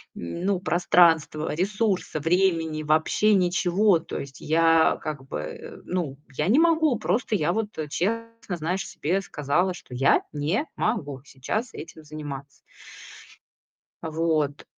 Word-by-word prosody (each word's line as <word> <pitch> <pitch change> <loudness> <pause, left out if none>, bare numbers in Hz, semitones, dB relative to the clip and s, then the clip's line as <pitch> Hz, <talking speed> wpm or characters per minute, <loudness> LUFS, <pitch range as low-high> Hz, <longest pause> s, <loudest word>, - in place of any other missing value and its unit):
ну, 180 - -2
пространства, 170 -4 +3
ресурса, 195 -2 -1
времени, 165 -2 +1
вообще 160 +8 +3
ничего". 180 +1 +3
То 165 - -7
есть 135 -1 -9
я 165 +1 +4
как 145 -3 -5
бы, 75 -4 -7
ну, 165 -7 -3 0.2
я 150 - 0
не 225 +8 +4
могу, 320 -6 +3
просто 220 -1 0
я 170 -2 +1
вот 220 -1 -1 0.2
честно, 230 +3 -3
знаешь, 170 +4 -2
себе 180 +6 -1
сказала, 175 +2 0
что 160 - -12
я 135 +2 +4
не 155 - 0
могу 145 - -2
сейчас 215 - -4
этим 160 -1 -10
заниматься. 145 -2 -8 1.4
А 160 - -3
вот. 155 -3 0
165 Hz, 125 wpm, -25 LUFS, 150-195 Hz, 1.4 s, я